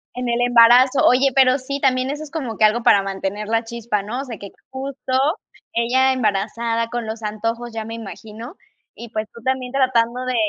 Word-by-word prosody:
En 250 -1 -3
el 235 0 0
embarazo. 245 +2 +5
Oye, 260 +3 +4
pero 260 0 +5
sí, 275 +2 -5
también 260 -1 +1
eso 295 +1 -5
es 305 - -10
como 260 -10 -4
que 215 - +5
algo 230 +2 +2
para 200 - +5
mantener 195 +2 -4
la 225 +1 0
chispa, 225 -3 -3
¿no? 240 +6 -4
O - - -7
sea, 235 -5 -7
que 200 0 -9 0.2
justo 265 0 -6 0.6
ella 260 +3 +2
embarazada 230 0 -1
con 240 -2 -4
los 220 0 -6
antojos, 230 +3 -3
ya 220 -1 -4
me 225 +1 -7
imagino, 225 - -9 0.4
y, 235 -1 -10
pues, 215 -1 -3
tú 235 - -13
también 260 -1 -2
tratando 250 -2 +1
de 255 -1 -2
235 Hz, 200 wpm, -20 LUFS, 220-260 Hz, 0.6 s, embarazo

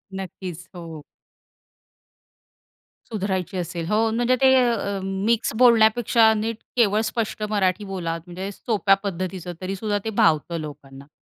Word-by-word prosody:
नक्कीच, 180 -2 -7
हो. 165 -3 -8 2.1
सुधारायची 190 -2 -2
असेल. 175 -1 -4
हो, 220 +2 +2
म्हणजे 240 +2 +2
ते 265 0 +6 0.2
अ, 200 -4 -2
मिक्स 205 +5 0
बोलण्यापेक्षा 230 -1 +5
नीट 225 +1 -2 0.2
केवळ 215 -3 +3
स्पष्ट 220 -2 -3
मराठी 200 -1 0
बोला, 175 -4 -3
म्हणजे 185 +2 -6
सोप्या 205 -1 +2
पद्धतीचं 185 -2 -4
तरीसुद्धा 195 +3 -2
ते - - -1
भावतं 165 +1 +2
लोकांना. 140 -2 -10
195 Hz, 120 wpm, -23 LUFS, 175-220 Hz, 2.1 s, ते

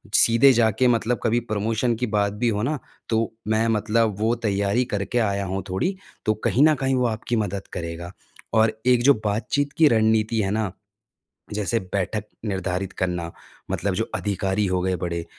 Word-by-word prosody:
सीधे 115 +4 +6
जाके 115 +1 +3
मतलब 120 0 +1
कभी 120 +1 +2
प्रमोशन 110 +3 0
की 125 +1 -2
बात 100 0 +1
भी 115 +3 0
हो 105 -1 -1
ना 145 +3 -1 0.3
तो 115 0 +1 0.2
मैं 110 +1 +2
मतलब 110 0 +1
वो 110 +2 +2
तैयारी 100 +4 +1
करके 100 +4 -1
आया 100 -3 0
हूँ 95 +1 -3
थोड़ी, 180 - -1 0.3
तो 110 - +3
कहीं 135 - +4
न 155 - +4
कहीं 135 -1 0
वो 125 - +1
आपकी 115 +2 -2
मदद 100 -3 -2
करेगा। 85 0 -5 0.4
और 110 0 +4
एक 125 -1 +4
जो 140 +2 +7
बातचीत 140 +7 -1
की 160 -2 +6
रणनीति 110 -1 +2
है 95 -1 -1
ना 105 -3 -1 0.8
जैसे 105 +2 0
बैठक 100 +2 -1 0.2
निर्धारित 95 -1 -2
करना। 90 -2 -2 0.4
मतलब 100 -2 -1
जो 110 - 0
अधिकारी 100 0 -1
हो 95 -1 0
गए 95 0 0
बड़े, 85 -1 -3
110 Hz, 175 wpm, -23 LUFS, 100-115 Hz, 0.8 s, जो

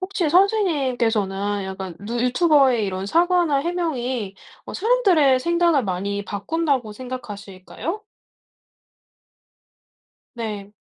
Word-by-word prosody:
혹시 370 -4 -1
선생님께서는 245 - +1
약간 190 -2 -6
누 235 +4 -4
유튜버에 260 -2 +3
이런 190 0 -3
사과나 345 - +2
해명이 260 - -2 0.3
어 - - -9
사람들의 370 - +3
생각을 340 -4 +2
많이 200 +2 -3
바꾼다고 255 +2 -1
생각하실까요? 240 - -7 2.3
네. 210 -3 -6
255 Hz, 245 characters per minute, -22 LUFS, 205-335 Hz, 2.3 s, 유튜버에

